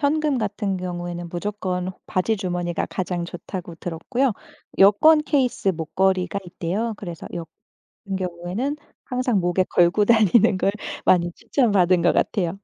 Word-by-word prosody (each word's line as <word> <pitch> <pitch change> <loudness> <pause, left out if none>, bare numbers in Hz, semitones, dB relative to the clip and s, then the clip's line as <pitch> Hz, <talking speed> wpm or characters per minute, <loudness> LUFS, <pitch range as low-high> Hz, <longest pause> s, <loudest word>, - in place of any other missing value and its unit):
현금 295 -1 +1
같은 205 -2 -2
경우에는 175 -1 -5
무조건 185 0 -3
바지 210 +4 0
주머니가 175 -3 -2
가장 180 -1 -3
좋다고 175 0 -7
들었고요 225 +11 -1 0.5
여권 300 +11 +6
케이스 260 -8 +1
목걸이가 185 +3 0
있대요. 195 +7 -3
그래서 175 -5 -8
여 170 -1 -5 0.6
은 195 - 0
경우에는 185 +9 -3 0.3
항상 250 -5 0
목에 175 +1 +1
걸고 175 +4 +3
다니는 220 -2 +4
걸 195 - +2 0.4
많이 175 -1 +4
추천받은 190 - +2
것 175 - +4
같아요. 185 -3 0
185 Hz, 320 characters per minute, -23 LUFS, 175-220 Hz, 0.6 s, 여권